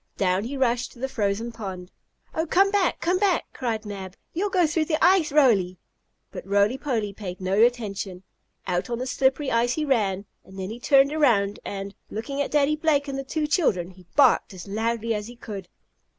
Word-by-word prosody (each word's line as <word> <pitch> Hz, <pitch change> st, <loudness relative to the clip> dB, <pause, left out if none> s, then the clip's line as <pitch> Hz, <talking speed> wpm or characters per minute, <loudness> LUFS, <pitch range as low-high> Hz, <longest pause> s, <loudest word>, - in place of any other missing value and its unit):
Down 190 Hz, +1 st, +1 dB
he 275 Hz, +4 st, -4 dB
rushed 245 Hz, -1 st, 0 dB
to 240 Hz, -, -17 dB
the 265 Hz, -, -1 dB
frozen 220 Hz, -1 st, -1 dB
pond. 190 Hz, -5 st, -7 dB, 0.4 s
"Oh, 320 Hz, +1 st, -1 dB
come 390 Hz, +5 st, +4 dB
back! 400 Hz, -3 st, +1 dB
Come 360 Hz, +2 st, +1 dB
back!" 390 Hz, -4 st, +2 dB
cried 225 Hz, -4 st, -3 dB
Mab. 190 Hz, -2 st, -7 dB, 0.2 s
"You'll 395 Hz, +5 st, -1 dB
go 365 Hz, -3 st, +3 dB
through 315 Hz, 0 st, 0 dB
the 310 Hz, -1 st, 0 dB
ice, 350 Hz, -3 st, +4 dB
Roly!" 215 Hz, -11 st, +3 dB, 0.5 s
But -, -, -7 dB
Roly 200 Hz, +4 st, +3 dB
Poly 225 Hz, -8 st, -2 dB
paid 185 Hz, -3 st, -7 dB
no 190 Hz, +3 st, +1 dB
attention. 205 Hz, -6 st, 0 dB, 0.4 s
Out 180 Hz, +3 st, -1 dB
on 235 Hz, -, -2 dB
the 255 Hz, -, -3 dB
slippery 265 Hz, +2 st, +1 dB
ice 235 Hz, +1 st, +2 dB
he 310 Hz, +2 st, -1 dB
ran, 205 Hz, -8 st, +1 dB, 0.2 s
and 190 Hz, -, -14 dB
then 190 Hz, +1 st, -4 dB
he 235 Hz, -, -7 dB
turned 275 Hz, +2 st, +4 dB
around 215 Hz, -10 st, +2 dB
and, 200 Hz, 0 st, -5 dB, 0.2 s
looking 275 Hz, +6 st, -4 dB
at -, -, -1 dB
Daddy 295 Hz, 0 st, +2 dB
Blake 300 Hz, -2 st, +1 dB
and 275 Hz, -, -4 dB
the -, -, -3 dB
two 305 Hz, +3 st, -2 dB
children, 205 Hz, -, +1 dB
he 185 Hz, -1 st, -18 dB
barked 260 Hz, -7 st, +4 dB
as 180 Hz, +2 st, -9 dB
loudly 225 Hz, +2 st, -1 dB
as 210 Hz, 0 st, -4 dB
he 240 Hz, -, -10 dB
could. 200 Hz, -6 st, -8 dB
235 Hz, 200 wpm, -25 LUFS, 200-285 Hz, 0.5 s, come